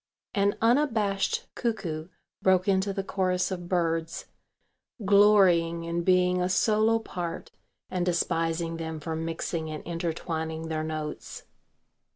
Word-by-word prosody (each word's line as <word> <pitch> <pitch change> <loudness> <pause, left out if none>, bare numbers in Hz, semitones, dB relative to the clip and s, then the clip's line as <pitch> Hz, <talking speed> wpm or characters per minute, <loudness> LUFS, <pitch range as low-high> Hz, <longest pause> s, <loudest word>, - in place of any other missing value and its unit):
An 200 0 +2
unabashed 225 -6 +2
cuckoo 170 -10 -3 0.3
broke 185 0 +3
into 195 0 +2
the 195 0 -3
chorus 185 -1 0
of 175 -2 -5
birds, 165 -2 -1 0.8
glorying 190 -5 +5
in 170 +1 -2
being 180 0 +3
a 180 - 0
solo 215 +4 +3
part 175 -6 -5 0.4
and 180 -1 0
despising 165 -1 0
them 160 -1 -5
for 160 +2 -4
mixing 165 0 -3
and 155 -1 -6
intertwining 160 -1 -3
their 155 -1 -2
notes. 155 -1 -5
175 Hz, 120 wpm, -27 LUFS, 165-195 Hz, 0.8 s, glorying